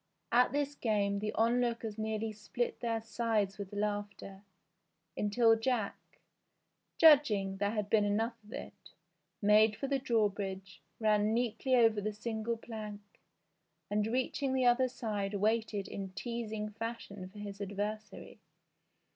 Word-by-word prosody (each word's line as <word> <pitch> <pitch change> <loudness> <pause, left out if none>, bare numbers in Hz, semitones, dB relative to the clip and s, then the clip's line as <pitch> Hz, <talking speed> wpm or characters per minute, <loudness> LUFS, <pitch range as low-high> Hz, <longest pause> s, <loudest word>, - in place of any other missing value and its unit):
At 245 +1 +5
this 285 +1 -1
game 205 -6 0
the 215 +1 -2
onlookers 230 -1 0
nearly 220 0 -2
split 215 +3 -3
their 230 -2 -1
sides 220 -4 -1
with 200 -2 -6
laughter, 205 -1 -4 0.7
until 225 +2 +4
Jack, 225 -2 -2 0.8
judging 215 -12 +5
there 200 +1 +1
had 210 -2 -2
been 210 0 +3
enough 220 +3 +1
of 210 - -16
it, - - -9 0.5
made 210 +1 +5
for 275 - -4
the 275 0 0
drawbridge, 200 -5 -1 0.2
ran 215 0 +3
neatly 245 +2 +1
over 225 -3 +4
the 215 +1 -2
single 220 +1 -3
plank, 210 -3 -9 0.7
and 210 +1 +1
reaching 260 +3 -1
the 260 -1 +2
other 245 +1 +4
side 210 -5 -3
waited 215 0 0
in 195 -1 -6
teasing 220 -1 -4
fashion 210 -4 -6
for 205 - -15
his 205 -1 -7
adversary. 205 +2 -5
215 Hz, 130 wpm, -33 LUFS, 205-235 Hz, 0.8 s, At